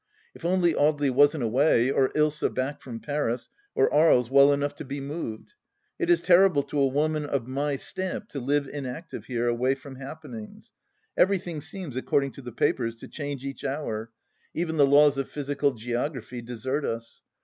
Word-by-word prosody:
If -, -, -15 dB
only 175 Hz, -1 st, +2 dB
Audely 145 Hz, -2 st, +2 dB
wasn't 145 Hz, +1 st, +4 dB
away, 125 Hz, +1 st, +3 dB
or 135 Hz, -1 st, +3 dB
Ilsa 150 Hz, 0 st, +2 dB
back 130 Hz, +3 st, -3 dB
from 115 Hz, -3 st, -8 dB
Paris, 145 Hz, -5 st, -2 dB, 0.3 s
or -, -, +3 dB
Aries 130 Hz, -6 st, +4 dB
well 140 Hz, +1 st, +7 dB
enough 145 Hz, 0 st, 0 dB
to -, -, -6 dB
be 140 Hz, 0 st, -5 dB
moved 140 Hz, -, -6 dB
I 420 Hz, -, -23 dB
It 350 Hz, -, 0 dB
is 345 Hz, -, +4 dB
terrible 180 Hz, -5 st, +5 dB
to 145 Hz, -, -3 dB
a 135 Hz, -, +4 dB
woman 150 Hz, +3 st, 0 dB
of 140 Hz, -4 st, -2 dB
my 140 Hz, +2 st, -1 dB
stamp 185 Hz, +8 st, -4 dB
to 140 Hz, -, -5 dB
live 140 Hz, +2 st, 0 dB
inactive 140 Hz, +4 st, -6 dB
here, 120 Hz, -1 st, -1 dB
away 125 Hz, +3 st, +1 dB
from 135 Hz, 0 st, -11 dB
happenings. 135 Hz, -5 st, -9 dB, 0.4 s
Everything 180 Hz, -4 st, +1 dB
seems, 175 Hz, -6 st, -7 dB
according 135 Hz, +1 st, 0 dB
to 140 Hz, -, -11 dB
the 125 Hz, -1 st, -8 dB
papers, 115 Hz, 0 st, 0 dB
to 115 Hz, -, -11 dB
change 145 Hz, -3 st, -5 dB
each 135 Hz, 0 st, -6 dB
hour; 115 Hz, -6 st, -3 dB, 0.5 s
even 160 Hz, -1 st, -1 dB
the 140 Hz, -2 st, +6 dB
laws 145 Hz, 0 st, +5 dB
of 135 Hz, -, -3 dB
physical 145 Hz, 0 st, 0 dB
geography 120 Hz, +1 st, -4 dB
desert 125 Hz, +5 st, -3 dB
us. 115 Hz, -1 st, -5 dB
140 Hz, 180 wpm, -26 LUFS, 125-150 Hz, 0.5 s, well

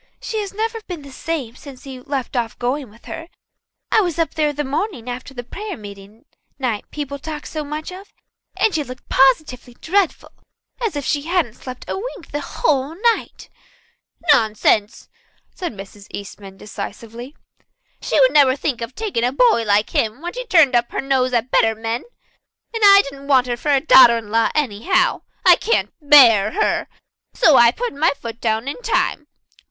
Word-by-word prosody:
"She 440 Hz, -, -4 dB
has 405 Hz, -2 st, -4 dB
never 450 Hz, +2 st, -3 dB
been 345 Hz, -5 st, -7 dB
the 280 Hz, -, -12 dB
same 265 Hz, -5 st, -4 dB
since 270 Hz, -1 st, -13 dB
he 265 Hz, -2 st, -9 dB
left 265 Hz, -1 st, -5 dB
off 235 Hz, -2 st, -2 dB
going 255 Hz, +1 st, -2 dB
with 225 Hz, +3 st, -20 dB
her. 325 Hz, 0 st, -7 dB, 0.6 s
I 440 Hz, -, +5 dB
was 350 Hz, -5 st, -2 dB
up 330 Hz, -1 st, 0 dB
there 300 Hz, -1 st, +1 dB
the 295 Hz, +1 st, -3 dB
morning 285 Hz, -, -3 dB
after 250 Hz, +2 st, -6 dB
that 245 Hz, 0 st, -9 dB
prayer 420 Hz, -1 st, -6 dB
meeting 205 Hz, +1 st, -13 dB, 0.3 s
night 245 Hz, -6 st, -3 dB
people 280 Hz, -1 st, -6 dB
talked 300 Hz, 0 st, -7 dB
so 310 Hz, -1 st, -5 dB
much 305 Hz, +3 st, -6 dB
of, 380 Hz, +2 st, -11 dB, 0.5 s
and 420 Hz, +2 st, +2 dB
she 310 Hz, -, 0 dB
looked 255 Hz, -2 st, -11 dB
positively 260 Hz, -2 st, +2 dB
dreadful, 385 Hz, +3 st, -1 dB, 0.5 s
as 435 Hz, -8 st, -1 dB
if 285 Hz, -2 st, -4 dB
she 290 Hz, -, 0 dB
hadn't 340 Hz, -10 st, 0 dB
slept 255 Hz, +1 st, -10 dB
a -, -, -3 dB
wink 445 Hz, -5 st, -8 dB
the 290 Hz, -, -2 dB
whole 285 Hz, +1 st, -1 dB, 0.2 s
night." -, -, -11 dB, 0.9 s
"Nonsense!" 215 Hz, -3 st, +1 dB, 0.5 s
said 355 Hz, -, -5 dB
Mrs. 200 Hz, -1 st, -12 dB
Eastman 195 Hz, -1 st, -9 dB
decisively. 230 Hz, +6 st, -8 dB, 0.7 s
"She -, -, 0 dB
would -, -, +4 dB
never 275 Hz, -3 st, +5 dB
think 275 Hz, -4 st, -3 dB
of 230 Hz, +3 st, -6 dB
taking 410 Hz, -, -2 dB
a 245 Hz, -, +1 dB
boy 285 Hz, -, +3 dB
like 210 Hz, +1 st, +2 dB
him 220 Hz, +3 st, -1 dB
when 345 Hz, +2 st, -6 dB
she'd -, -, -7 dB
turned 320 Hz, -, +5 dB
up 240 Hz, 0 st, +1 dB
her -, -, -2 dB
nose 265 Hz, -2 st, +1 dB
at 240 Hz, +1 st, -1 dB
better 225 Hz, -1 st, +3 dB
men. 225 Hz, +2 st, -4 dB, 0.7 s
And 455 Hz, -, -4 dB
I 400 Hz, 0 st, +8 dB
didn't 275 Hz, 0 st, -10 dB
want 260 Hz, -3 st, +4 dB
her 245 Hz, -1 st, -2 dB
for 270 Hz, +5 st, -4 dB
a 280 Hz, -2 st, +4 dB
daughter 260 Hz, -5 st, +7 dB
in 215 Hz, -2 st, -8 dB
law 230 Hz, 0 st, +2 dB
anyhow. 300 Hz, -, +1 dB, 0.2 s
I -, -, +7 dB
can't 465 Hz, -, 0 dB
bear 245 Hz, -9 st, +6 dB
her. 430 Hz, -, 0 dB, 0.5 s
So 315 Hz, -, +5 dB
I 235 Hz, -2 st, +7 dB
put 485 Hz, -, -4 dB
my 310 Hz, +4 st, +2 dB
foot 230 Hz, 0 st, -8 dB
down 225 Hz, +2 st, -1 dB
in 290 Hz, -, -5 dB
time. 310 Hz, -9 st, -1 dB
270 Hz, 185 wpm, -20 LUFS, 235-325 Hz, 0.9 s, I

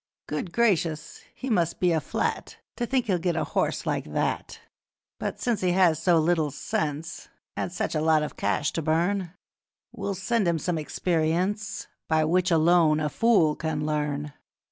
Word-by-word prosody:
Good 150 Hz, +4 st, -4 dB
gracious! 175 Hz, -7 st, 0 dB
he 265 Hz, -, -6 dB
must 170 Hz, -9 st, +1 dB
be 180 Hz, -1 st, +3 dB
a 160 Hz, -2 st, +1 dB
flat -, -, -3 dB, 0.2 s
To 240 Hz, -, -1 dB
think 260 Hz, -1 st, +1 dB
he'll 190 Hz, -5 st, +1 dB
get 175 Hz, 0 st, 0 dB
a -, -, 0 dB
horse -, -, -1 dB
like -, -, -2 dB
that! -, -, -2 dB, 0.6 s
'But -, -, -4 dB
since 240 Hz, -3 st, 0 dB
he 180 Hz, -1 st, +2 dB
has 175 Hz, -4 st, +3 dB
so 175 Hz, 0 st, +4 dB
little 160 Hz, -1 st, +2 dB
sense 155 Hz, +3 st, -4 dB, 0.3 s
And -, -, -3 dB
such 180 Hz, -, -2 dB
a 155 Hz, -, 0 dB
lot 155 Hz, -1 st, +3 dB
of 150 Hz, -, -5 dB
cash 145 Hz, -, 0 dB
to 165 Hz, -, -1 dB
burn, 170 Hz, +4 st, 0 dB, 0.6 s
We'll 200 Hz, -1 st, -4 dB
sell 220 Hz, +4 st, 0 dB
him 170 Hz, -2 st, +1 dB
some 165 Hz, 0 st, -1 dB
experience 180 Hz, +6 st, -1 dB, 0.2 s
By 160 Hz, -1 st, +3 dB
which 180 Hz, +3 st, +2 dB
alone 165 Hz, -2 st, +4 dB
a 150 Hz, -1 st, 0 dB
fool 195 Hz, -8 st, +3 dB
can 155 Hz, -2 st, -2 dB
learn. 150 Hz, -1 st, -2 dB
170 Hz, 170 wpm, -26 LUFS, 155-185 Hz, 0.6 s, so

